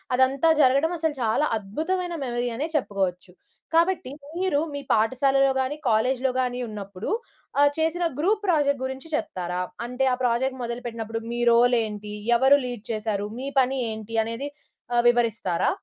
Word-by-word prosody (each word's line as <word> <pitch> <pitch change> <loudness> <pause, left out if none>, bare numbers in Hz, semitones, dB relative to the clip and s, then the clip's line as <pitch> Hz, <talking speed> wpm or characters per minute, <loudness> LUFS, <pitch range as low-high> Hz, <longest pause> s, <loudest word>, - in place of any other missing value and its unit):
అదంతా 265 +5 +3
జరగడం 275 +6 +3
అసలు 320 -2 0
చాలా 225 +7 +2
అద్భుతమైన 340 - -2
మెమరీ 240 0 -1
అనే 295 +5 -1
చెప్పుకోవచ్చు. 190 -7 -2 0.4
కాబట్టి 335 -3 +2 0.3
మీరు 365 -6 +1
మీ 285 - -3
పాఠశాలలో 270 +5 +3
గానీ, 260 +3 -2
కాలేజ్‌లో 255 +4 +2
గానీ 250 -1 -2
ఉన్నప్పుడు 200 -2 -6 0.5
ఆహ్, 285 0 +6
చేసిన 325 +2 0 0.2
గ్రూప్ 405 +7 +2
ప్రాజెక్ట్ 310 -6 +3 0.2
గురించి 265 +3 -6
చెప్తారా? 180 - -3 0.2
అంటే 250 +2 -2
ఆ - - +2
ప్రాజెక్ట్ 255 +2 +1
మొదలుపెట్టినప్పుడు 235 -2 -4
మీ 240 - -3
రోల్ 245 +1 +5
ఏంటి? 210 -1 -6 0.2
ఎవరు 265 +3 +6
లీడ్ 245 -4 -6
చేశారు? 215 -2 -2
మీ 265 - -4
పని 265 +1 +2
ఏంటి? 220 +1 -7
అనేది 230 +6 -4 0.5
ఆహ్, 240 - +4
వివరిస్తారా? 230 -7 +1
250 Hz, 145 wpm, -25 LUFS, 220-285 Hz, 0.5 s, ఆహ్